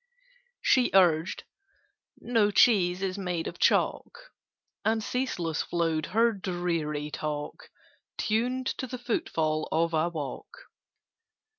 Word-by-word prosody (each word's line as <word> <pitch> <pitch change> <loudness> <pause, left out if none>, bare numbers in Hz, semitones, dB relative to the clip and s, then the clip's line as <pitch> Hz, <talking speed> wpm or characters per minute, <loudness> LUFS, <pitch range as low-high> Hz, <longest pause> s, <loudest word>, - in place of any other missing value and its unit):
She 255 -2 +4
urged 175 -2 +3 0.8
"No 225 -4 +2
cheese 190 -4 +4
is 190 +1 -2
made 180 -3 -2
of - - -6
chalk": - - 0 0.5
And 220 0 +1
ceaseless 180 - -2
flowed 165 -2 -1
her 230 +3 +3
dreary 170 -6 -3
talk, 150 -1 -5 0.5
Tuned 245 +4 0
to 260 - -3
the 250 +1 -6
footfall 160 -10 -1
of 165 +1 +1
a 160 +2 +2
walk. 150 -6 -8
180 Hz, 110 wpm, -28 LUFS, 160-225 Hz, 0.8 s, She